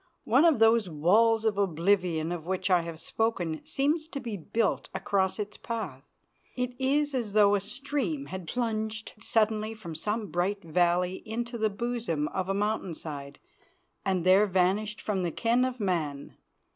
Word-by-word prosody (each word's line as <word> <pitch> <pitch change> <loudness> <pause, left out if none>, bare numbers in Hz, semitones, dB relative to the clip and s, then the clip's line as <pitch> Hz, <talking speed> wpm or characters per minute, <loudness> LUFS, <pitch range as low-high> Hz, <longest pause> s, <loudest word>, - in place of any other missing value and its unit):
One 260 +8 +4
of 325 -4 +5
those 225 -3 +4
walls 215 +9 +3
of 210 -2 +1
oblivion 175 -2 +1
of 170 -2 -5
which 190 +1 -1
I 180 -1 +5
have 165 -1 -7
spoken 175 -9 -1
seems 305 +3 0
to 285 - -5
be 235 -5 -5
built 205 +4 -1
across 190 0 0
its 210 -1 -5
path. 205 - -5 0.5
It 250 0 -2
is 290 +2 +1
as 235 -6 -2
though 205 -1 +5
a 205 - +3
stream 245 - -2
had 180 +3 -7
plunged 220 -2 -2
suddenly 215 0 +1
from 185 -7 -8
some 210 +2 -3
bright 190 +4 -1
valley 175 +2 +1
into 235 +2 -4
the 220 -2 +1
bosom 215 -8 -2
of 190 0 -3
a 195 - +1
mountain 205 -4 -1
side 140 -3 -7 0.7
and 185 -3 0
there 190 +3 +6
vanished 195 +3 +1
from 200 -3 -1
the 175 -2 -1
ken 235 +8 +2
of 255 -1 -2
man. 160 -8 -2
205 Hz, 165 wpm, -28 LUFS, 175-230 Hz, 0.7 s, there